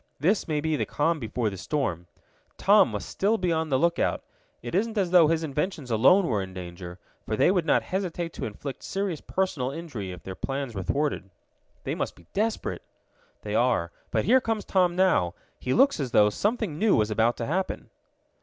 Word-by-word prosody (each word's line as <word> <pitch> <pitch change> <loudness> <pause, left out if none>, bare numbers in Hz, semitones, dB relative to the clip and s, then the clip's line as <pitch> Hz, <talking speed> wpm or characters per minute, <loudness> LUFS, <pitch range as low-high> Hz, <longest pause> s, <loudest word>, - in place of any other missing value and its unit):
This 185 +9 +1
may 150 -2 0
be 160 0 0
the - - -2
calm 160 +2 0
before 115 -2 -2
the 95 - -7
storm. 90 - -2 0.5
Tom - - +5
must - - -5
still 210 +4 +1
be 180 -3 0
on 160 -1 0
the 135 - +2
lookout. 170 +4 +1 0.4
It 120 - -6
isn't 220 +4 0
as 185 -4 +1
though 175 -4 +7
his 165 +1 +1
inventions 150 -2 -3
alone 155 - +5
were 110 -10 0
in 95 -1 -7
danger, 90 0 -8 0.3
for 110 - 0
they 140 - +4
would 180 -4 0
not - - +3
hesitate 175 -3 -3
to - - -5
inflict 130 +6 -7
serious 195 -5 -3
personal 170 -9 -1
injury 140 - -6
if 90 -2 -10
their 95 - -6
plans 135 +3 -4
were 95 - -4
thwarted." 140 -1 -1 0.5
"They - - -2
must - - -3
be 85 - -19
desperate." 220 +2 -1 0.6
"They - - -4
are. - - +2 0.2
But - - 0
here 260 +1 +5
comes 225 -3 -2
Tom 180 -2 +2
now. 180 - +2 0.2
He 125 - -3
looks 275 - +4
as 135 -3 -2
though 105 -3 +4
something 210 - -1
new 215 0 +4
was 105 0 +1
about 115 +3 +2
to 115 - -3
happen." 185 +8 -3
150 Hz, 200 wpm, -26 LUFS, 115-185 Hz, 0.6 s, though